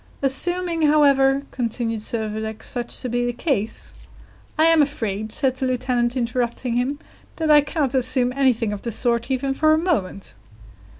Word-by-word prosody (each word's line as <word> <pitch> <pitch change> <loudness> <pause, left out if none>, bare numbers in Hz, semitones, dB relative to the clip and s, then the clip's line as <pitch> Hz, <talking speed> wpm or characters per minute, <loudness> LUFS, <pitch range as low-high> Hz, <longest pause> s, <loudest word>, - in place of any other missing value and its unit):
"Assuming, 345 +5 +1
however," 275 -2 +4
continued 230 -2 -2
Servadac, 220 -1 -4
"such 240 -1 -4
to - - -2
be 245 0 -1
the 245 - 0
case 230 -5 -2 0.3
" - - -29
"I 315 - +4
am 330 -1 +5
afraid," 220 -7 -2
said 260 +2 0
the 260 - -1
lieutenant, 250 -1 0
interrupting 240 0 -2
him, 255 +4 0 0.4
"that 315 -1 0
I 295 -1 +8
cannot 290 -3 -2
assume 255 -1 +1
anything 250 -5 +1
of 200 - -6
the 235 - -4
sort 235 +2 -1
even 270 +1 0
for 310 +3 +3
a - - +1
moment." 280 - -2
255 Hz, 165 wpm, -22 LUFS, 235-280 Hz, 0.4 s, I